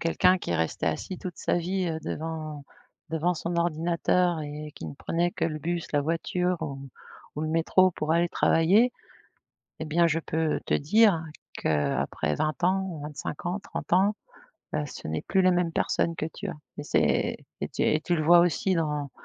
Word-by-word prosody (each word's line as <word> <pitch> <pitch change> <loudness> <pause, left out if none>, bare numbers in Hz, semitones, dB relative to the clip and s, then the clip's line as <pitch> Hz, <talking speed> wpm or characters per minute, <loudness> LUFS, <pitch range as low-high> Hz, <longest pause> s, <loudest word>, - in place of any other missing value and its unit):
quelqu'un 180 +2 +3
qui - - -6
est - - +1
resté 80 -2 -1
assis 80 - -2
toute 180 -3 -6
sa - - 0
vie, 180 +1 -1
heu, 160 -1 -2
devant 155 -2 -5 0.4
devant 165 +3 0
son 170 +1 -3
ordinateur 170 +1 +1
et 150 +1 -6
qui 80 - -7
ne 75 - -7
prenait 170 - -1
que 190 -5 -2
le 155 -2 -2
bus, 170 +2 -3
la 145 - +3
voiture 175 +3 0
ou 140 -2 -5 0.5
ou - - -2
le 155 - -1
métro 165 +3 +4
pour 155 -1 -1
aller 170 +1 +3
travailler 195 +11 +4 0.9
et - - -2
bien 165 +2 +3
je 165 0 +1
peux 160 -1 -1
te - - +1
dire 170 +1 +4 0.3
qu'après 75 0 0
20 155 +2 -1
ans, 185 -3 0
25 150 +2 -6
ans, 180 +3 -1
30 - - -7
ans, 195 +4 +4 0.6
heu, 150 - 0
ce - - -8
n'est 80 0 -2
plus 190 - +2
la 185 - +6
même 175 -2 +1
personne 165 +1 0
que 155 - -3
tu - - -6
as - - -3 0.3
et - - -4
c'est 145 - +1 0.2
c'est - - -3
t - - +1
et 155 - +1
tu 175 - 0
le 155 - 0
vois 175 +2 +7
aussi 175 +2 +2
dans 150 -4 -1
165 Hz, 195 wpm, -27 LUFS, 150-175 Hz, 0.9 s, vois